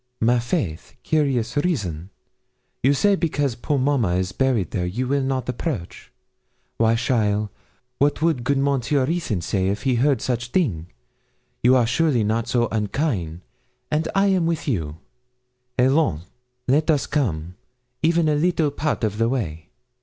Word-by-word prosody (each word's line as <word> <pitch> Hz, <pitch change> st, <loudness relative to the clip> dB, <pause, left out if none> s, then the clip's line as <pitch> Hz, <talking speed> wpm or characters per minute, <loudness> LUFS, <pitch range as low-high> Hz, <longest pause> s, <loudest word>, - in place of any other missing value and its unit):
'My 120 Hz, +2 st, +3 dB
faith, 120 Hz, -, -3 dB
curious 135 Hz, -7 st, 0 dB
reason; 100 Hz, -, -1 dB, 0.7 s
you 135 Hz, -, +4 dB
say 205 Hz, +7 st, +3 dB
because 145 Hz, -7 st, 0 dB
poor 135 Hz, +5 st, -2 dB
mamma 130 Hz, -9 st, +1 dB
is 95 Hz, +1 st, -1 dB
buried 125 Hz, -, 0 dB
there 90 Hz, -2 st, -1 dB
you 120 Hz, +9 st, -2 dB
will 140 Hz, +1 st, +1 dB
not 130 Hz, -2 st, -2 dB
approach! 125 Hz, -, -5 dB, 0.7 s
Why, 115 Hz, 0 st, +3 dB
cheaile, 105 Hz, -4 st, 0 dB, 0.5 s
what 145 Hz, +1 st, +2 dB
would 155 Hz, -6 st, +1 dB
good 140 Hz, +3 st, +1 dB
Monsieur 140 Hz, 0 st, +1 dB
Ruthyn 155 Hz, -, -1 dB
say 95 Hz, +2 st, -1 dB
if 100 Hz, +2 st, -2 dB
he 130 Hz, -3 st, +1 dB
heard 140 Hz, -1 st, +3 dB
such 120 Hz, -1 st, -2 dB
thing? 115 Hz, -, 0 dB, 0.7 s
You 125 Hz, +2 st, +5 dB
are 125 Hz, -2 st, +4 dB
surely 125 Hz, -1 st, +2 dB
not 110 Hz, +2 st, 0 dB
so 120 Hz, -1 st, +1 dB
unkain', 105 Hz, -, -2 dB, 0.5 s
and 155 Hz, +2 st, +1 dB
I 195 Hz, +1 st, +4 dB
am 185 Hz, -4 st, +2 dB
with 165 Hz, -2 st, -2 dB
you. 80 Hz, -, -2 dB, 0.8 s
Allons. 130 Hz, -, +2 dB, 0.4 s
Let 150 Hz, +5 st, +2 dB
us 150 Hz, -4 st, +3 dB
come 90 Hz, -, -2 dB, 0.5 s
even 165 Hz, 0 st, +3 dB
a 155 Hz, -, +3 dB
little 155 Hz, -1 st, +1 dB
part 145 Hz, -2 st, -2 dB
of 105 Hz, 0 st, -1 dB
the 115 Hz, 0 st, +2 dB
way.' 85 Hz, -11 st, -3 dB
125 Hz, 155 wpm, -22 LUFS, 105-145 Hz, 0.8 s, You